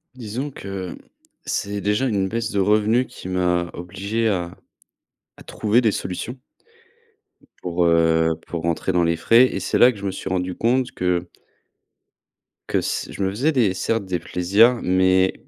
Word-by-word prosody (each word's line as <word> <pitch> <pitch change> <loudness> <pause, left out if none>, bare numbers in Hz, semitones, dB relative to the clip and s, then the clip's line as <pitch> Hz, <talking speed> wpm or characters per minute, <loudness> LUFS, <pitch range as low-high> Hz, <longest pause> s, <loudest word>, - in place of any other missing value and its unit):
Disons 125 +4 -5
que 95 -6 -6 0.5
c'est 100 0 -2
déjà 105 +6 +1
une 100 -5 0
baisse 115 +1 -2
de 100 - 0
revenus 110 +5 +2
qui - - -10
m'a 90 -1 0
obligé 100 +6 -2
à 90 -4 -2 0.8
à - - -12
trouver 110 +3 +1
des 110 -4 +2
solutions 100 +7 -5 1.3
pour, 90 -1 0
heu, 80 -1 +3
pour 85 -2 -5
rentrer 85 +2 -1
dans 90 -2 +2
les 85 0 +1
frais, 115 +9 +5
et 100 -6 -3
c'est - - 0
là 125 0 +6
que - - -13
je 100 - -11
me 95 - -1
suis 95 - -7
rendu 90 0 -1
compte 125 +4 0
que 90 -1 -1 1.4
que - - +1
s - - -3
je - - -7
me 95 - +1
faisais 125 +11 0
des, 115 -10 +2
certes, 115 +1 -1
des 90 -2 -2
plaisirs, 100 +9 +3
mais 95 0 +3
95 Hz, 165 wpm, -22 LUFS, 90-115 Hz, 1.4 s, là